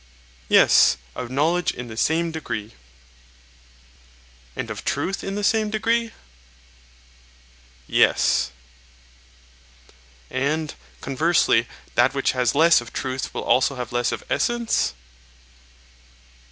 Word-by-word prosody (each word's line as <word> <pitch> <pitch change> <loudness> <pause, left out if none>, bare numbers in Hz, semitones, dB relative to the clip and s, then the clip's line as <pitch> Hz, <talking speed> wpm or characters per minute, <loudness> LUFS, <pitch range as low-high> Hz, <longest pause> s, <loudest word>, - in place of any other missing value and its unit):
Yes, - - +5 0.2
of 125 -2 -6
knowledge 160 +7 +1
in 125 - -8
the 110 - -9
same 165 +7 +1
degree. 120 -9 -5 1.8
And - - -5
of - - -7
truth 195 +1 -2
in 195 - -4
the 205 - -3
same 215 0 +2
degree? 230 +2 0 1.7
Yes. - - +2 1.8
And, 150 +4 -1 0.3
conversely, 135 -4 +2 0.3
that 125 +3 +3
which 140 - +1
has 125 -1 0
less 165 -1 +5
of 120 - -11
truth 130 0 -4
will - - -5
also 135 +2 +2
have 125 -1 -6
less 120 0 0
of - - -5
essence? 235 - 0
140 Hz, 105 wpm, -23 LUFS, 125-175 Hz, 1.8 s, Yes